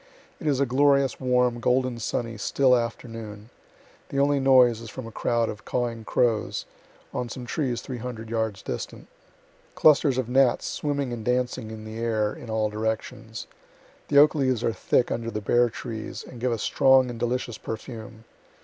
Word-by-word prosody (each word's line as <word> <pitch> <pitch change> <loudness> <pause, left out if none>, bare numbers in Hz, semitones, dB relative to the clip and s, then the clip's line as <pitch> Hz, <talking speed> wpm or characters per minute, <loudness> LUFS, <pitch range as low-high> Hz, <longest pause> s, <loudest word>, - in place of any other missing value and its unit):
It 160 - -5
is 140 -3 +2
a 140 - +3
glorious, 140 +1 +3
warm, 125 -2 +2
golden 125 0 +1
sunny, 115 +1 -2
still 125 +4 +3
afternoon. 115 -2 -5 0.6
The 140 - -4
only 140 0 +3
noise 125 -4 +5
is 115 - -8
from 130 0 -7
a 115 - -8
crowd 115 +1 0
of 110 0 -6
cawing 115 -2 -2
crows, 115 -2 0 0.5
on 125 -1 -3
some 125 +1 -7
trees 125 -3 -2
three 125 -2 -6
hundred 115 -2 -6
yards 110 -3 -2
distant. - - -6 0.7
Clusters 145 -3 +5
of 130 -3 -1
gnats 130 0 +3
swimming 140 -4 -2
and 115 -2 -5
dancing 125 -1 -1
in 110 0 -8
the 110 +1 -7
air 110 -2 0
in 120 - -10
all 110 -1 0
directions. 110 +1 -4 0.6
The 145 - +2
oak 150 +1 +7
leaves 130 -6 0
are 115 - +1
thick 120 - +1
under 115 -1 -2
the 105 - -3
bare 120 +4 +3
trees, 110 -1 -6
and 125 - -10
give 125 0 +1
a 115 - 0
strong 130 +3 +4
and 115 - -8
delicious 120 -1 -2
perfume. 110 0 -7
120 Hz, 175 wpm, -26 LUFS, 110-130 Hz, 0.7 s, oak